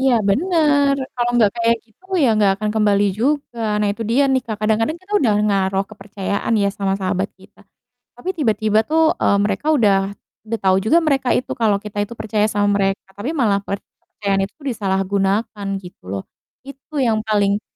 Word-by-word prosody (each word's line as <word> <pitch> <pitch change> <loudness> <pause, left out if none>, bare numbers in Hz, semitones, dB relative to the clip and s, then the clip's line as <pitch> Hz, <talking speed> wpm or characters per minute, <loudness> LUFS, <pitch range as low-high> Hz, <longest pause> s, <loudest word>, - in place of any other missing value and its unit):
Iya, 265 -1 +3 0.2
benar. 290 - +3 0.2
Kalau 240 0 +1
nggak 220 -4 +4
kayak 230 0 +2
gitu 230 - -32
ya 290 -8 +4
nggak 200 -2 +4
akan 215 0 0
kembali 205 -1 +3
juga. 255 +3 -1 0.2
Nah 210 - +1
itu 225 +2 -6
dia 245 +6 +3
nih, 260 -1 +2
Kak, 220 -2 -3
kadang-kadang 225 +8 +1
kita 375 +3 -14
udah 225 -6 +3
naroh 195 -1 +1
kepercayaan 200 +1 -4
ya, 200 -1 +2
sama 195 -1 -1
sahabat 190 +1 -1
kita. - - -20 0.6
Tapi 370 - -5
tiba-tiba 220 -6 +2
tuh, 320 +3 +3
eee, 200 - +3
mereka 205 +9 0
udah 200 -8 +3 0.3
udah 225 +1 -4
tau 190 -1 +3
juga 220 - +3
mereka 270 -4 +1
itu 255 - -3
kalau 215 -3 +1
kita 205 0 -5
itu 205 +3 -4
percaya 215 0 0
sama 205 -1 +1
mereka, 195 0 -1
tapi 205 +8 -5
malah 220 -10 +1
kepercayaan 200 0 -4
itu 200 - -17
disalahgunakan, 200 -1 -1
gitu 180 -2 -14
loh. 95 0 -4 0.4
Itu 275 +2 -10
yang 230 -5 +2
paling 205 -2 +1
215 Hz, 175 wpm, -20 LUFS, 200-250 Hz, 0.6 s, nggak